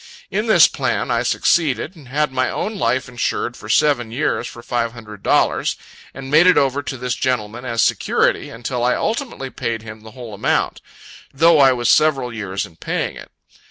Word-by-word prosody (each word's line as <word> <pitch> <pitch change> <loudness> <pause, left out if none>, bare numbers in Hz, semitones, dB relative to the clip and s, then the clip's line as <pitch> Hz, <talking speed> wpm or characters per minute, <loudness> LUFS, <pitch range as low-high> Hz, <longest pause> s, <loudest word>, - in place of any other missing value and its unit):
In 210 +4 -1
this 220 - +7
plan - - -2
I - - +1
succeeded; 155 - +1
and 150 -6 -15
had 150 +2 0
my 130 -1 0
own 215 - -3
life 125 - 0
insured 120 0 -2
for - - -11
seven 140 -6 +2
years 125 +7 -1
for 120 - -11
five 115 -1 -2
hundred 105 -4 -11
dollars, - - +1 0.4
and 135 0 -9
made 160 +4 +6
it 185 - +5
over 140 0 +2
to 145 -2 -5
this 125 0 -2
gentleman, 120 -2 -2
as 115 -2 +1
security; - - +1
until 120 +1 -4
I 125 - +2
ultimately 220 - -3
paid 115 -1 -3
him 110 -1 -10
the 110 - -12
whole 120 -4 -8
amount; 100 - -1 0.5
though 160 +3 +4
I 135 -2 +6
was 120 -1 -2
several 135 -6 +3
years 100 -3 -3
in 80 - -17
paying - - -3
it. - - -11
125 Hz, 190 wpm, -19 LUFS, 115-145 Hz, 0.5 s, this